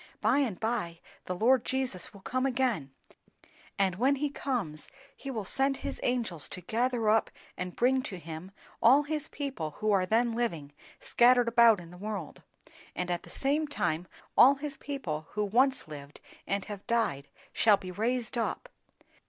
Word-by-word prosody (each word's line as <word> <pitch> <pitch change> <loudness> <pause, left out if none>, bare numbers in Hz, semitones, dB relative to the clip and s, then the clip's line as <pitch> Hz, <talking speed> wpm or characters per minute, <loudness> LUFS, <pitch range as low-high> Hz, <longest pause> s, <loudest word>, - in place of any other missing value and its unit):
By - - +3
and 235 -10 -1
by 215 -7 -2 0.3
the 180 - -3
Lord 240 +6 +4
Jesus 255 -9 -3
will 200 - -14
come 255 +6 0
again; 245 - 0 0.9
and 190 -2 +1
when 265 +6 +3
he 290 +1 -2
comes 220 - -3 0.3
he 275 - -8
will 220 -6 -3
send 270 +6 +1
his - - -5
angels 230 - -2
to 180 - -7
gather 235 +4 0
up 220 +1 +3 0.3
and 180 -1 -5
bring 260 +2 +3
to 200 -7 -6
him 165 +1 -8 0.3
all 260 +6 +6
his 300 0 -3
people 260 - -4
who 215 0 0
are 190 -2 +2
then 230 +3 +2
living, 170 -12 -2 0.3
scattered 245 0 +4
about 235 -3 +6
in 170 -1 -11
the 180 - -12
world, 200 -5 -6 0.5
and 180 0 -2
at 175 - -1
the - - -14
same 295 +3 0
time 175 - -1 0.3
all 275 +3 +8
his 290 +1 -5
people 165 - -5
who 210 0 0
once 255 - +2
lived 145 -1 -10 0.3
and 200 -1 -1
have 205 -1 -8
died 180 -13 0 0.3
shall 210 -2 +5
be 185 -1 -8
raised 235 +4 -1
up. 230 - -3
225 Hz, 170 wpm, -30 LUFS, 180-260 Hz, 0.9 s, all